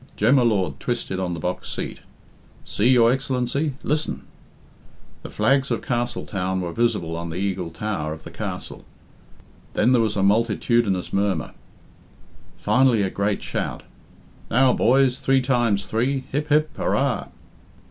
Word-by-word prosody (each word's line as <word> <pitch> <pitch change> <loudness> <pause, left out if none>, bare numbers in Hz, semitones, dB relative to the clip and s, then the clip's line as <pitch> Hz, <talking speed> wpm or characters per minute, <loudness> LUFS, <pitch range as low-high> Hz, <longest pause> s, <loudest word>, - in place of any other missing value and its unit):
Jem 115 +7 +4
y - - +5
Lord 95 - +1
twisted 120 -6 -3
on 90 -2 -2
the - - -6
box 90 +3 -3
seat. - - -5 0.7
"See, 110 +4 +1
your 120 -2 +6
Excellency! 135 +2 -1
Listen!" 150 +1 -1 1.0
The - - -8
flags 135 0 +2
of - - -2
Castletown 100 -6 -2
were 85 -2 -4
visible 85 -8 0
on 85 0 -5
the 80 - -5
Eagle 95 -2 -2
Tower 85 -3 -3
of 80 0 -8
the - - -10
castle. - - -6 0.9
Then 125 - +3
there 125 -2 +4
was 110 -2 0
a 95 - +1
multitudinous 105 -1 +1
murmur. 100 -5 0 1.0
Finally 125 -5 +3
a 95 - -1
great 100 0 -1
shout. - - -4 0.7
"Now, 125 +2 +4
boys! 130 +1 +3
Three 135 0 +3
times 120 -6 +1
three! 130 +4 0
Hip, 150 +3 -2
hip, 155 +1 +2
hurrah!" 135 -3 0
115 Hz, 145 wpm, -23 LUFS, 95-130 Hz, 1.0 s, your